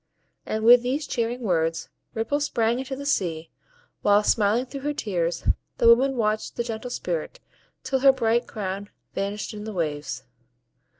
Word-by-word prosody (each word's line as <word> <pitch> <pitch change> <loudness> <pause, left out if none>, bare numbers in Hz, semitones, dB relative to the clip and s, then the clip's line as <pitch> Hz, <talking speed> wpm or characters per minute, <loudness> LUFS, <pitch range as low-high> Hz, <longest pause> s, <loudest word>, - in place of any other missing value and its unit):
And 220 0 -2
with 240 +2 +8
these 265 +5 -1
cheering 240 0 -2
words 165 -6 0 0.3
Ripple 225 +6 0
sprang 235 -4 +1
into 265 +1 -4
the 280 +1 -7
sea; 170 - -1 0.5
while, 205 0 +4
smiling 220 +4 +2
through 275 +2 -7
her 295 +1 -2
tears, 175 - -1 0.3
the 230 - +3
woman 260 +4 +6
watched 215 -1 0
the 235 - -1
gentle 235 +1 -5
Spirit, - - -4 0.4
till 265 - 0
her 270 +1 +7
bright 235 -2 +1
crown 200 -1 -5 0.2
vanished 205 +3 -3
in 210 -1 -7
the 215 0 -6
waves. 145 -6 -3
225 Hz, 160 wpm, -25 LUFS, 200-260 Hz, 0.5 s, with